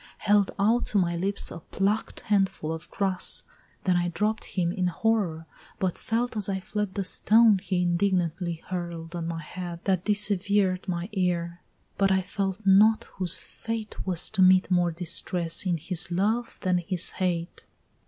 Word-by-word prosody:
Held 205 -2 +2
out 225 +5 +2
to 210 - -1
my 175 -3 +1
lips 195 +4 -1
a 170 - -7
pluck'd 200 +6 -2
handful 195 -6 0
of 160 - -8
grass! 190 -2 +1 0.4
Then 180 -2 +2
I 175 0 0
dropt 210 +5 -1
him 175 -2 -1
in 185 -1 -1
horror, 180 -4 0 0.3
but 185 -2 -1
felt 235 +1 -2
as 205 -2 +2
I 190 -1 -1
fled 205 0 -4
The 200 - -1
stone 215 +2 +4
he 180 -1 -1
indignantly 175 -2 0
hurl'd 170 -2 -5
at 170 - -3
my 165 -1 -4
head, 175 +1 -7
That 185 -3 0
dissever'd 205 -2 +1
my 175 -1 -2
ear, 175 -3 -1 0.4
but 195 -1 +3
I 190 0 +2
felt 195 +1 -3
not, 210 +3 +5 0.2
whose 185 -2 +4
fate 225 -2 -6
Was 180 -3 +1
to 195 - +1
meet 185 0 +5
more 175 -1 +3
distress 170 +1 0
in 175 -2 +1
his 175 +3 -2
love 215 +7 -1
that 180 -2 +1
his 175 0 0
hate! 175 -2 -2
185 Hz, 165 wpm, -26 LUFS, 175-200 Hz, 0.4 s, not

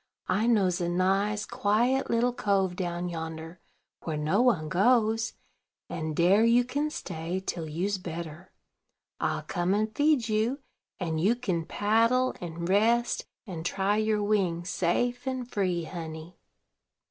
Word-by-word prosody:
I 200 +5 +2
knows 190 -6 +2
a 170 - 0
nice, 195 +4 +1
quiet 240 +3 +1
little 240 +1 +2
cove 195 -5 +1
down 175 -1 -3
yonder, 160 0 -6 0.4
where 155 -2 -3
no 155 +9 +2
one 215 -12 +2
goes; 220 +5 +2 0.6
and 155 -1 -3
dare 185 +7 +4
you 235 +2 +5
kin 285 +5 -1
stay 175 - -4
till 170 -4 -4
you's 190 +6 -1
better. 170 0 -7 0.7
I'll - - -1
come 175 +2 0
and 215 +1 -1
feed 290 -5 +3
you, 220 +4 +1 0.4
and 160 -4 -2
you 210 +7 +3
kin 185 -9 -2
paddle, 230 +5 +2
and 170 -1 -5
rest, 230 +5 +2 0.2
and 175 -6 -6
try 195 +3 0
your 215 -1 +1
wings, 180 -4 0
safe 245 +10 0
and 260 -2 -2
free, 185 -7 -1
honey." 160 0 -8
195 Hz, 140 wpm, -28 LUFS, 170-230 Hz, 0.7 s, you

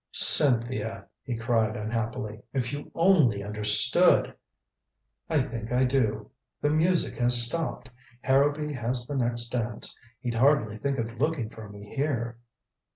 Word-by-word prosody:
"Cynthia!" 120 -4 +5 0.2
he 120 -3 -4
cried 115 -2 0
unhappily. 110 -1 -4
"If 130 -1 -2
you 145 0 -7
only 160 - +3
understood 105 - +2 0.5
" - - -55
"I 150 -4 +2
think 115 -4 -7
I 125 +1 +2
do. 115 -5 -1 0.3
The 145 - 0
music 170 +3 +1
has 120 0 +4
stopped. 125 -1 -4 0.3
Harrowby 145 +3 +1
has 120 -1 -3
the 145 - -6
next 120 -2 -1
dance 120 -2 -3 0.3
he'd 120 -2 -3
hardly 115 -4 +2
think 140 +2 -2
of 115 +1 -5
looking 145 -8 -1
for 110 -2 -11
me 100 0 -12
here." 120 -5 -2
120 Hz, 140 wpm, -26 LUFS, 115-140 Hz, 0.5 s, Cynthia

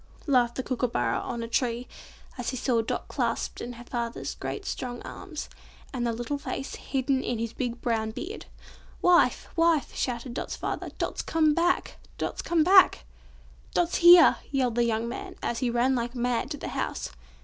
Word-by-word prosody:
laughed 245 -5 +3
a 260 - -1
Kookooburra 235 - 0
on 235 -2 -4
a - - -4
tree, 240 0 -1 0.5
as 245 -2 -3
he 255 - -3
saw 240 -1 +1
Dot 225 - -3
clasped - - -2
in 245 - -5
her 240 0 -10
father's 235 -1 -4
great 405 - -5
strong 245 -1 -4
arms, 330 -6 -7 0.5
and 240 -2 -1
the - - +1
little 240 +5 -3
face 270 0 -5
hidden 265 0 -1
in 245 - -1
his 230 0 -3
big 245 -2 -3
brown 225 -2 0
beard. 350 - -7 0.6
"Wife! 355 -1 +4
wife!" 330 -4 +2
shouted 245 0 -2
Dot's - - -4
father, - - -4
"Dot's - - -2
come 310 -2 +2
back! 345 +3 +1 0.2
Dot's - - -3
come 335 -2 +2
back!" 375 +3 +6 0.7
"Dot's 350 -1 +2
here!" 345 -1 +8
yelled 260 -4 +1
the 240 +1 +2
young 225 0 0
man, 375 +8 -6
as 235 - -1
he 250 - 0
ran 240 +3 +2
like 240 0 -2
mad 245 -1 0
to - - -4
the - - -5
house. - - -3
250 Hz, 180 wpm, -27 LUFS, 235-305 Hz, 0.7 s, here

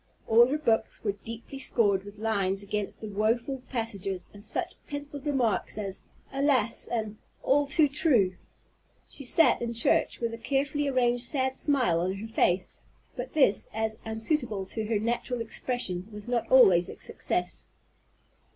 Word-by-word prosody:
All 235 +2 +7
her 285 +4 0
books 230 -8 0
were 205 - +1
deeply 230 +6 -9
scored 205 -7 +2
with 205 0 -11
lines 200 -3 0
against 205 0 -4
the 220 - -5
woful 230 +6 0
passages, 200 -6 -4
and 205 0 -12
such 220 - -2
pencilled 285 0 -6
remarks 250 -8 0
as 195 -2 -5 0.3
"Alas!" 270 -5 +1
and 220 -3 -3 0.3
"All 285 +1 +3
too 300 +2 +4
true!" 255 - +3 0.7
She 280 - -10
sat 320 +6 +4
in 235 0 -2
church 230 - +2
with 230 -1 -2
a 230 - -7
carefully 280 +4 0
arranged 245 -2 +1
sad 260 0 0
smile 255 - +2
on 180 +2 0
her 210 +3 -6
face; 185 -4 0 0.3
but 250 -1 -6
this, 265 -10 +3
as 220 0 -1
unsuitable 220 -2 -1
to 220 -1 -2
her 220 -1 +1
natural 240 +3 -2
expression, 225 -5 -3
was 210 +1 -9
not 235 -2 -1
always 190 -9 +6
a - - -9
success. - - -2
230 Hz, 155 wpm, -28 LUFS, 205-265 Hz, 0.7 s, All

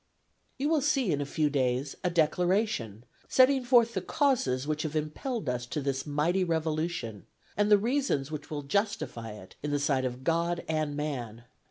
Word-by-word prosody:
You 275 - 0
will 315 -1 +2
see, 270 - +2
in 145 -1 0
a 140 - -3
few 155 +1 +1
days, 130 0 0
a 180 - +2
Declaration 170 - +1 0.2
setting 260 0 +5
forth 240 -2 +4
the - - -1
causes 185 - +1
which 155 0 -1
have 155 -1 -4
impelled 155 - -3
us 125 -1 -2
to 150 - -3
this 135 0 -2
mighty 160 +6 +1
revolution, 160 - -2 0.3
and 205 0 +2
the 210 - +8
reasons 225 - 0
which 150 -1 -6
will 150 -2 -4
justify 140 - -2
it 95 -3 -13
in 150 - -3
the 145 - +1
sight 140 -2 +1
of 130 0 -4
God 170 +2 0
and 155 -2 -1
man. 120 -7 -4
155 Hz, 180 wpm, -29 LUFS, 135-200 Hz, 0.3 s, the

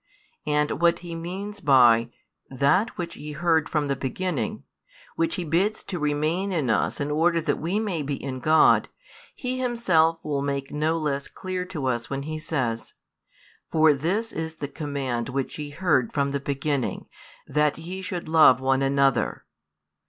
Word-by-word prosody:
And 150 0 0
what 170 0 +4
he 170 - -6
means 190 +5 -6
by 120 - +5 0.4
"that 140 - +1
which 170 -1 -4
ye 150 0 -7
heard 160 0 +1
from 150 -2 0
the 140 - 0
beginning," 185 - -3 0.5
which 330 0 0
he 180 - -3
bids 180 +7 0
to 180 - -5
remain 155 +6 0
in 150 -10 0
us - - 0
in 145 0 -2
order 165 +3 +2
that 150 -2 -1
we 175 +6 -1
may 195 -7 -2
be 140 0 -2
in 135 -1 -5
God, 155 +5 +4 0.5
he 255 0 -3
himself 185 -10 +2
will 145 -2 -1
make 140 -1 -3
no 155 +2 0
less 140 -3 -2
clear 185 -1 -4
to 165 -7 -5
us 120 -2 -1
when 140 0 -3
he 155 +1 -4
says: 130 -8 -3 0.8
For 155 -1 +5
this 185 +11 -1
is 160 0 -4
the 145 -2 -5
command 140 -5 -3
which 135 +3 -3
ye 150 -1 -5
heard 145 -6 +1
from 140 -1 0
the 140 - -1
beginning, 140 -1 -2 0.4
that 150 0 +1
ye 180 +4 -6
should 180 -3 -5
love 155 -5 +6
one 135 0 +1
another. 135 -2 +1
155 Hz, 165 wpm, -25 LUFS, 140-175 Hz, 0.8 s, love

